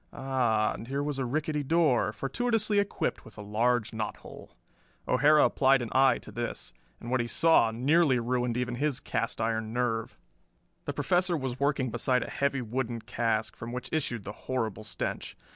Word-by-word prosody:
Ah, 120 -5 +1
and 115 - -8
here 140 +2 -2
was 145 -2 -3
a 130 - 0
rickety 150 +3 -1
door, 145 -6 +2
fortuitously 215 - 0
equipped 200 0 -2
with - - -15
a 105 - -7
large 115 +2 +1
knot 110 -1 -3
hole. - - -13 0.5
O'Hara 150 +4 +5
applied 135 0 +4
an 115 - -5
eye 130 -2 +4
to - - -12
this 120 0 -5 0.3
and 120 - -7
what 130 - +2
he 120 - -1
saw 160 -3 +4
nearly 135 +5 +3
ruined 120 0 -1
even 125 -1 -2
his 145 -1 0
cast 115 -3 -3
iron 110 0 -1
nerve. 115 -2 -1 0.7
The - - -3
Professor 180 -1 +1
was 130 -3 -4
working 140 -3 0
beside 125 +2 +1
a - - -7
heavy 140 -2 0
wooden 120 0 -3
cask, 110 0 -1
from 115 - -7
which 125 - -5
issued 120 -8 -1
the 100 - -6
horrible 110 -4 -3
stench. 105 - -4
125 Hz, 175 wpm, -29 LUFS, 115-140 Hz, 0.7 s, O'Hara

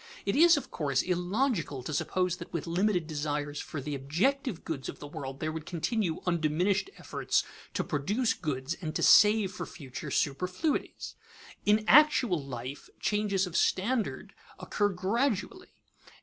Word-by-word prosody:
It 200 - 0
is, 335 +2 +7
of 285 - -6
course, 140 -4 0
illogical 180 - -1
to 155 - -5
suppose 180 +4 0
that 170 - -9
with 170 -4 -3
limited 180 +1 +1
desires 145 -1 -3
for 155 - -5
the 145 +2 -4
objective 175 - -1
goods 145 -5 -4
of - - -7
the - - -9
world 135 -2 -7
there 155 0 -2
would 160 -1 -7
continue 180 0 -1
undiminished 175 - +1
efforts - - 0 0.3
to - - 0
produce 205 - 0
goods 140 -2 -3
and 155 -3 -4
to - - 0
save 210 -2 +6
for 185 - -6
future 140 -8 -8
superfluities. 180 - -1 0.5
In 215 +1 +4
actual 250 - +5
life 130 +1 -7
changes 205 -2 +1
of 175 -2 -8
standard 220 +6 0 0.3
occur 205 -1 0
gradually. 225 - -1
180 Hz, 150 wpm, -29 LUFS, 150-210 Hz, 0.5 s, is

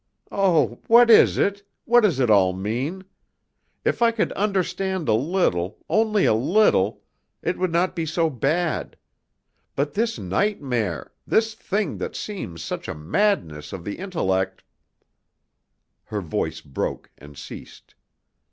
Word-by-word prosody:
"Oh! 165 - +2
what 235 +1 +7
is 220 - +6
it? 200 0 +1 0.2
What 240 +1 +5
does 180 - +2
it 125 -4 +3
all 95 -3 +4
mean? 120 - -3 0.8
If - - 0
I 235 - +6
could 230 -1 -1
understand 190 -3 -1
a - - +3
little 110 - 0
only 215 -2 +2
a - - +4
little 125 - +2 0.4
it 180 - -1
would 185 -1 0
not 175 +3 +1
be 165 -2 -2
so 165 +2 +1
bad. 155 +5 -1 0.8
But 145 +1 -1
this 225 +2 0
nightmare, 115 - -2
this 220 0 +2
thing 210 -1 -2
that - - -4
seems 90 - -6
such - - -5
a - - -4
madness 80 - -1
of 95 -3 -6
the 100 - -5
intellect 95 - -1 0.7
" - - -53
Her 105 -1 -4
voice 80 -1 -3
broke 70 -4 -4
and 75 +1 -14
ceased. - - -11
160 Hz, 140 wpm, -23 LUFS, -, 0.8 s, what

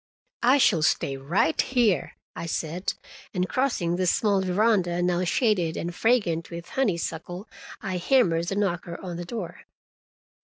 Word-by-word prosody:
"I 255 +4 +5
shall 195 - +4
stay 140 -3 +1
right 160 +4 +1
here," 230 - +1 0.2
I 170 - -5
said, 165 +3 -2 0.4
and 180 0 +1
crossing 190 -11 0
the 185 0 0
small 200 +1 +2
veranda, 185 -2 +2
now 180 0 +1
shaded 180 -5 +1
and 170 +1 -3
fragrant 185 -7 +1
with 170 0 -8
honeysuckle, 175 -4 -2 0.4
I 185 -2 -2
hammered 175 -5 +2
the 195 - -2
knocker 175 -4 -2
on 180 -3 -6
the 175 - -5
door. 180 -4 -6
180 Hz, 145 wpm, -26 LUFS, 170-210 Hz, 0.4 s, I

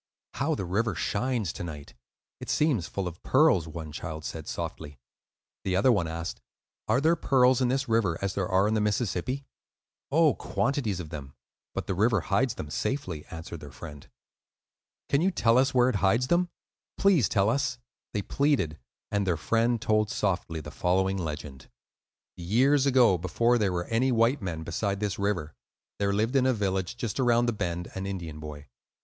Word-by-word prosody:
"How - - 0
the 95 - -4
river 100 +3 0
shines 110 +2 -1
to - - -6
night! 75 -4 -8 0.5
it - - -8
seems 135 - +2
full 100 -2 -3
of 85 -1 -8
pearls," 85 -4 +4
one 80 -1 -7
child 80 0 -6
said, 80 -2 -6
softly. 75 -1 -5 0.7
The 95 -1 0
other 105 +7 +4
one 100 -8 +1
asked, 85 +1 -5 0.5
"Are 110 +4 +3
there 160 +4 +3
pearls 130 -5 +3
in 125 - +3
this 135 +3 0
river 110 -8 +1
as 100 -1 -2
there 95 -2 -1
are 95 +2 +3
in 110 - +1
the 110 - +1
Mississippi?" 110 +5 -1 0.7
"Oh, 155 0 +5
quantities 125 -8 -1
of 80 -4 -6
them; 70 -3 -8 0.4
but - - -2
the - - -1
river 105 +1 +2
hides 115 +4 +1
them 75 - -7
safely," 90 - -3
answered 80 0 -8
their 75 - -10
friend. 70 +2 -10 1.0
"Can 140 - +2
you 185 - +3
tell 120 -9 +3
us 135 +1 +3
where 125 -2 +4
it 120 - 0
hides 115 +7 +2
them? 175 +1 +2 0.5
Please 185 - +4
tell 100 -2 +2
us," 130 +1 0 0.3
they 105 - -2
pleaded; 120 - 0 0.3
and 100 -1 0
their 85 -3 +1
friend 115 +7 +1
told 110 0 +1
softly 95 -8 -1
the - - -9
following 95 +2 +1
legend:— 75 -5 -6 0.7
Years 130 +11 +3
ago, 125 -9 +5
before 115 +8 +2
there 100 -3 +1
were 90 -1 -2
any 120 +3 +1
white 120 +3 +3
men 85 -4 -4
beside 100 +5 -2
this 105 -1 -2
river, 90 -7 -1 0.5
there 100 0 +1
lived 110 +6 0
in 130 -1 +4
a 130 - +3
village 95 0 -1
just 120 -2 -3
around 120 -2 +3
the 120 - +1
bend 85 -4 -3
an 95 0 -4
Indian 85 -6 -5
boy. 75 -1 -8
100 Hz, 180 wpm, -28 LUFS, 85-125 Hz, 1.0 s, Oh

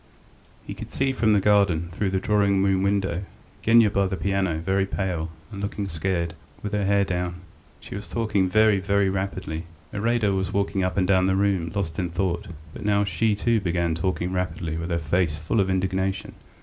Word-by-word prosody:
He - - -5
could - - -8
see 135 0 0
from 115 -4 +2
the 105 - +4
garden, 95 -5 +3
through 95 +3 -1
the 95 0 0
drawing 100 -1 +2
room 95 -1 +2
window, 95 -3 0 0.4
Genya 115 -2 +5
by 100 -1 +2
the 95 0 -3
piano, 95 -4 0
very 95 +4 0
pale, 90 -5 -2 0.2
and 100 -2 -6
looking 100 0 -3
scared, 85 -1 -2 0.3
with 105 0 -4
her 105 -1 +1
hair 100 0 +3
down. 90 -1 -3 0.4
She - - -10
was 100 +1 -6
talking 105 -5 0
very, 110 0 +4
very 100 0 +2
rapidly.... 95 -4 -3 0.3
Iraida 110 -1 +1
was 95 -1 -1
walking 100 -1 0
up 90 +1 -1
and 90 -1 +2
down 95 -1 +4
the 95 - +2
room, 95 -4 +1
lost 85 -6 -2
in 90 -2 -1
thought; 90 0 -1 0.3
but - - -8
now 100 -1 +2
she, 105 +1 +1
too, 115 +2 +2
began 85 -3 0
talking 90 +2 -1
rapidly 85 -3 -2
with 85 +2 -4
her 85 - +1
face 85 0 0
full 80 +8 -1
of 95 -1 +2
indignation. 95 0 -1
95 Hz, 195 wpm, -25 LUFS, 90-100 Hz, 0.4 s, Genya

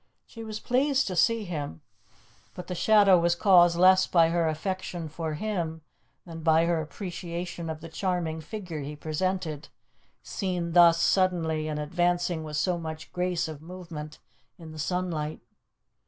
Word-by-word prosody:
She 230 - -10
was 215 -1 -6
pleased 270 +2 +1
to 185 - -3
see 230 +4 +2
him, 145 - -5 0.7
but 180 - -7
the 180 - -5
shadow 195 +1 +5
was 170 0 +2
caused 175 -3 +5
less 185 +1 +6
by 165 -2 +4
her 170 -1 +1
affection 175 +1 -3
for 155 0 -4
him 165 -4 -3 0.4
than 165 -2 -8
by 160 0 +4
her 170 -1 +1
appreciation 175 +1 -6
of 160 0 -5
the 165 - -8
charming 165 -2 -2
figure 180 -2 -6
he 145 +1 -6
presented, 160 0 -3 0.5
seen 180 -4 -3
thus 170 -1 +6
suddenly 165 -5 +1
and 150 -1 -3
advancing 175 +1 0
with 150 -1 -5
so 175 +2 0
much 160 -1 -7
grace 180 -2 -1
of 155 -2 -8
movement 165 -3 -8 0.4
in 165 -2 -11
the 155 - -10
sunlight. 160 -2 -2
170 Hz, 155 wpm, -27 LUFS, 160-185 Hz, 0.7 s, less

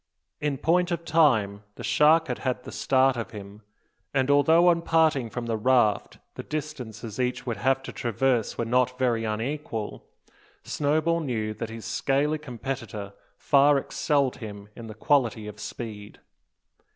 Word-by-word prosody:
In 145 -2 -1
point 175 +5 +2
of 170 -1 -3
time 120 -11 +3
the - - -9
shark 160 +2 +4
had - - -3
had 125 -1 -2
the - - -9
start 130 0 +2
of 115 -2 -4
him; 105 -1 -10 0.5
and, 135 +1 +2
although 160 +5 +5
on 170 -1 +2
parting 160 -7 +2
from 120 +1 -5
the 115 -1 -1
raft 110 -3 +2 0.2
the - - -6
distances 125 -8 -6
each 125 0 -1
would 120 -4 -3
have 135 +5 +1
to - - -7
traverse 120 0 0
were 115 - -1
not 125 +2 +1
very 120 -3 +1
unequal, 115 0 -4 0.6
Snowball 155 +3 0
knew 115 -8 -2
that 115 +1 -6
his 115 0 -8
scaly 145 +3 0
competitor 120 -6 -6 0.2
far 145 0 +4
excelled 140 -1 0
him 105 -3 -9
in 115 -1 -9
the 110 - -9
quality 115 -3 +1
of 105 0 -9
speed. 105 -1 -7
125 Hz, 155 wpm, -26 LUFS, 110-145 Hz, 0.6 s, although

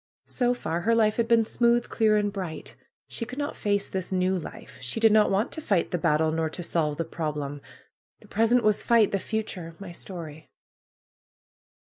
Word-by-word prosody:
So 245 -1 0
far 170 -7 -3
her 230 +5 +2
life 215 -2 +3
had 230 -1 +1
been 230 -1 +4
smooth, 235 +1 +2
clear 215 -2 +2
and 205 -1 0
bright. 185 -6 -6 0.3
She - - -5
could 250 +3 -7
not 290 +1 -3
face 205 -1 0
this 190 -1 -4
new 185 0 +1
life. 170 -6 -8
She 125 - -3
did 225 -1 +5
not 215 0 +5
want 195 +3 0
to 315 - -6
fight 195 - 0
the 180 - -1
battle; 160 -1 +2
nor 160 0 -1
to 175 +3 -6
solve 155 -3 -1
the 165 - -2
problem. 150 -3 -4 0.6
The - - -18
pres 225 +2 +1
ent 245 -1 +4
was 215 -1 +2
fight; 230 -3 +4
the 195 - 0
future 185 -6 -4
— - - -32
my 195 -3 -8
story. 165 -4 -8
200 Hz, 200 wpm, -26 LUFS, 165-225 Hz, 0.6 s, did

